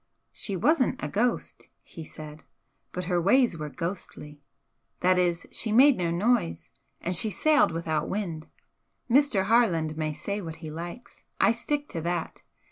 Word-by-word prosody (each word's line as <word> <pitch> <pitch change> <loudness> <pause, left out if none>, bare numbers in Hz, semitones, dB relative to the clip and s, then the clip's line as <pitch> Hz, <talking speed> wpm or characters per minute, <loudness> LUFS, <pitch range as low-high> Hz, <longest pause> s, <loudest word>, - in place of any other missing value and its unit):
"She 200 - -2
wasn't 260 - +2
a - - 0
ghost," 235 +4 -2
he 165 - -10
said 155 0 -10 0.5
"but 180 - -4
her 175 -1 +1
ways 235 +2 +4
were 150 -2 -5
ghostly. 150 -3 -6 0.6
That 180 0 +4
is, 175 -1 0
she 220 - 0
made 265 +5 +7
no 175 -2 0
noise, 170 - 0 0.3
and 180 +1 -1
she 215 +5 +3
sailed 305 +8 +3
without 160 -2 -2
wind. 170 -6 -4 0.6
Mr. 255 -6 +3
Harland 180 -8 +2
may 155 -1 -1
say 200 +6 -4
what 165 -3 -7
he 160 -2 -8
likes, 175 +10 -9 0.2
I - - +5
stick 285 +5 -2
to 165 - -4
that. 170 0 -3
180 Hz, 155 wpm, -27 LUFS, 160-230 Hz, 0.6 s, made